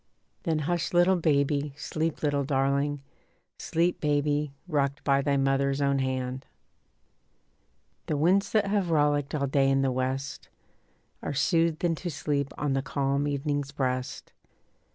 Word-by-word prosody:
Then 165 -3 +1
hush 175 +1 -1
little 175 +2 +4
baby, 145 -3 +1
sleep 160 +1 -3
little 145 -1 +1
darling, 140 +1 0 0.6
Sleep 170 +2 0
baby, 145 0 +1 0.2
rocked 140 -3 -1
by 140 -1 +3
thy 140 0 +1
mother's 135 0 +1
own 140 -1 +2
hand. 130 0 -3 1.6
The 150 - 0
winds 185 +7 +2
that 215 -2 +3
have 200 -3 0
rollicked 145 -2 +1
all 140 -2 0
day 135 0 +2
in 135 0 +2
the 135 - +1
west 130 +2 -3 0.7
Are - - -4
soothed 165 +3 +1
into 175 +1 0
sleep 145 -2 -2
on 145 -2 0
the 135 - +1
calm 140 -1 -1
evening's 145 0 -2
breast. 130 -2 -3
145 Hz, 135 wpm, -27 LUFS, 135-155 Hz, 1.6 s, little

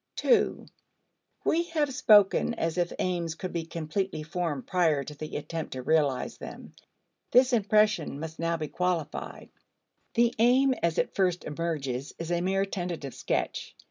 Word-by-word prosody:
(2) 460 -3 +2 0.8
We 330 - +3
have 310 -5 -1
spoken 210 0 +5
as 165 -3 -1
if 175 0 0
aims 170 -3 -1
could 185 +2 -6
be 165 -2 -3
completely 165 +1 -3
formed 155 -4 -3
prior 165 -6 +2
to 150 - -8
the 155 +1 -5
attempt 160 +2 -5
to 130 -1 -5
realize 145 -3 +1
them. - - -9 0.6
This 255 +1 +5
impression 210 -8 +2
must 160 +1 -7
now 165 0 0
be 155 -1 -4
qualified. 175 -3 -3 0.7
The 235 0 +3
aim 260 +3 +5
as 170 -1 +1
it - - 0
first 180 -2 +1
emerges 145 -4 -3
is 165 +1 -5
a 175 0 +1
mere 195 +2 +1
tentative 175 -8 -4
sketch. - - -3
170 Hz, 150 wpm, -28 LUFS, 155-200 Hz, 0.8 s, spoken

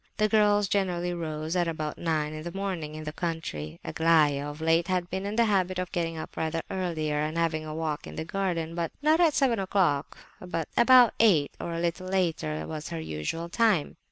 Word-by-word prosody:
The 215 - +3
girls 210 -1 +3
generally 180 -3 0
rose 160 -1 -4
at 175 -1 +2
about 155 -2 -4
nine 155 -2 -1
in 155 - -6
the 170 +2 -6
morning 185 -6 -4
in 155 - -6
the 150 - -4
country; 120 - -4
Aglaya, 150 -3 +3
of 145 +1 -9
late, 165 +1 +2
had 180 -1 -1
been 190 +2 -2
in 205 - -3
the 235 0 +4
habit 185 -3 +1
of 180 0 -3
getting 165 -2 -2
up 155 - -7
rather 160 +1 -2
earlier 160 -5 -1
and 155 +2 -2
having 160 -2 0
a 155 - -5
walk 155 -2 -3
in - - -9
the 160 - -4
garden, 170 -3 -2
but 170 -1 -2
not 310 +2 +4
at 330 -4 +4
seven 245 -6 +2
o'clock; 185 -7 0 0.2
about 235 - +4
eight 175 -11 +4
or 170 - -4
a - - -2
little 170 +2 -2
later 160 - -1
was 155 - -6
her 165 -1 -4
usual 160 - -4
time. 205 -4 +1
170 Hz, 205 wpm, -27 LUFS, 155-190 Hz, 0.2 s, the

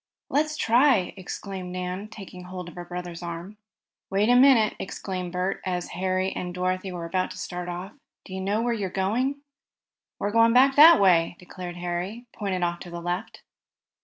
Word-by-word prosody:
"Let's 305 +1 +1
try!" 235 -6 +3
exclaimed 190 -1 -6
Nan, 180 +2 -4
taking 195 -4 -10
hold 180 -1 -7
of - - -13
her 175 0 -7
brother's 175 -1 -6
arm. 175 +4 -6 0.5
"Wait 200 +3 +2
a 245 - +6
minute!" 250 -4 +6
exclaimed 185 -2 -5
Bert 180 +2 -2
as 180 -1 -2
Harry 185 +1 -1
and 180 -1 -5
Dorothy 185 +1 -1
were 175 -2 -5
about 185 +2 -1
to - - -9
start 180 0 -5
off. 180 +3 -6 0.3
"Do 190 - -9
you 190 - -4
know 205 +4 0
where 240 0 +1
you're 200 -4 -2
going?" 240 +10 -1 0.8
"We're 205 - -2
going 230 +1 +5
back 270 +2 +6
that 320 +3 +9
way," 175 -3 +4
declared 180 -1 -8
Harry, 180 +7 -4
pointing 190 -4 -2
off 175 0 -1
to 175 - -9
the 170 0 -6
left. 175 +5 -4
185 Hz, 180 wpm, -26 LUFS, 180-215 Hz, 0.8 s, that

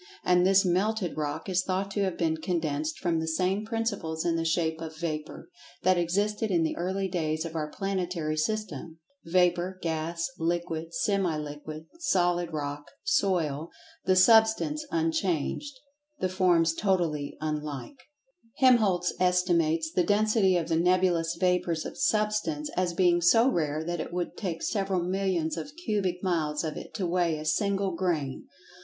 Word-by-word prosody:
And 180 0 +4
this 195 0 +5
"melted 185 +1 0
rock" 150 +2 -3
is 185 -1 +1
thought 190 +1 -2
to 205 - -1
have 185 - -3
been 160 -1 0
condensed 155 -3 -2
from 170 -3 0
the 160 - -3
same 185 +5 0
principles 210 -8 -2
in 170 -1 +2
the 165 - 0
shape 160 0 0
of 160 -1 -7
vapor, 155 -2 -5 0.4
that 185 +1 +4
existed 205 +5 0
in 170 -4 +2
the 160 - -1
early 190 +2 -1
days 160 -3 -2
of 165 - -6
our 155 -1 -2
planetary 180 -4 -2
system. 165 -3 -3 0.3
Vapor, 180 +1 +2
gas, 165 +1 -2
liquid,[Pg 165 -1 -1
88] 165 - -22
semi 195 -6 +1
liquid, 150 +1 -7
solid 175 - +1
rock, 145 -1 -4 0.2
"soil"—the 180 - -1
Substance 220 +10 +4
unchanged, 295 - -1 0.4
the 185 - 0
forms 175 -3 +3
totally 165 -7 -1
unlike. 150 - -4 0.6
Helmholtz 210 -9 +4
estimates 170 -3 +2
the 180 - +3
density 205 -1 +3
of 165 -2 -2
the 165 - +2
nebulous 175 -1 +2
vapors 180 -3 +1
of - - -6
Substance 210 -9 0
as 180 -2 0
being 175 -1 +3
so 225 +8 +5
rare 155 - 0
that 175 0 -3
it - - -6
would 175 0 -3
take 170 -5 -4
several 195 -4 0
millions 185 -3 -1
of 285 - -5
cubic 190 -4 -1
miles 160 -5 0
of 155 -1 -3
it - - -8
to 195 - -1
weigh 170 -2 +1
a 155 - -7
single 195 +3 +1
grain. 165 -7 -2
175 Hz, 155 wpm, -28 LUFS, 160-195 Hz, 0.6 s, this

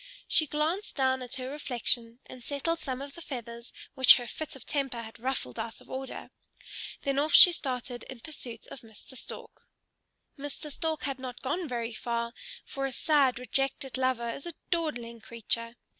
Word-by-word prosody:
She 310 - +4
glanced 315 +8 0
down 260 -1 +2
at 250 0 -3
her 260 0 -4
reflection 240 -4 0
and 255 -2 -11
settled 310 +5 -1
some 260 -1 -3
of 280 0 -8
the 340 - -10
feathers 235 -5 -6 0.2
which 260 -2 +10
her 245 - -3
fit 305 +6 -5
of 265 - -10
temper 270 -5 -1
had 220 0 -10
ruffled 245 - -2
out 225 - -4
of - - -15
order. 265 0 -5 0.7
Then 275 0 +2
off 305 +2 +1
she 355 - +12
started 250 -6 -1
in 260 -3 -7
pursuit 245 -7 -6
of 260 - -8
Mr. 225 +3 -11
Stork. - - -8 0.7
Mr. 290 +1 -4
Stork 315 -1 -1
had 270 -1 -2
not 255 -1 -6
gone 315 +6 0
very 235 -3 -2
far, 235 +1 -2 0.3
for 275 -1 -2
a - - -4
sad, 275 -2 +4
rejected 270 +1 -1
lover 255 -2 +1
is 275 - -5
a 345 - -4 0.2
dawdling 245 -9 -1
creature. 230 +1 -1
260 Hz, 175 wpm, -30 LUFS, 235-285 Hz, 0.7 s, she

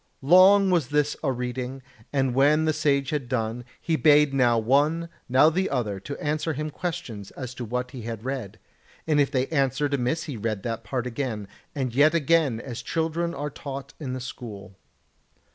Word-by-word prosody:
Long 190 +5 +6
was 170 -8 +2
this 150 +1 +1
a 140 - +1
reading, 125 +1 -4 0.3
and 135 -3 +1
when 150 +4 +4
the 155 - +2
Sage 140 -3 +1
had 140 -5 -2
done, 115 -1 -2 0.2
he 165 - 0
bade 150 -2 +5
now 120 -3 +3
one, 145 +8 +2 0.2
now 135 +5 +5
the 190 +4 0
other 105 -7 -2 0.2
answer 155 +2 -1
him 150 +2 -4
questions 155 - -5
as 130 -2 -6
to 125 - -6
what 125 +2 -3
he 130 - -8
had 115 0 -6
read; 130 -7 -4 0.5
and 150 -2 +3
if 140 - +2
they 130 -2 0
answered 140 -1 0
amiss 140 +4 0
he 145 -7 -6
read 110 -2 -3
that 115 -1 -3
part 120 +3 -3
again, 120 -5 -3 0.3
and 130 -4 -2
yet 150 +5 +4
again, 160 -6 +2
as 120 -1 -6
children 165 +1 -2
are 145 +1 -4
taught 140 0 -7
in 135 -5 -4
the 130 - -4
school. 110 -6 -8
135 Hz, 180 wpm, -25 LUFS, 125-155 Hz, 0.5 s, Long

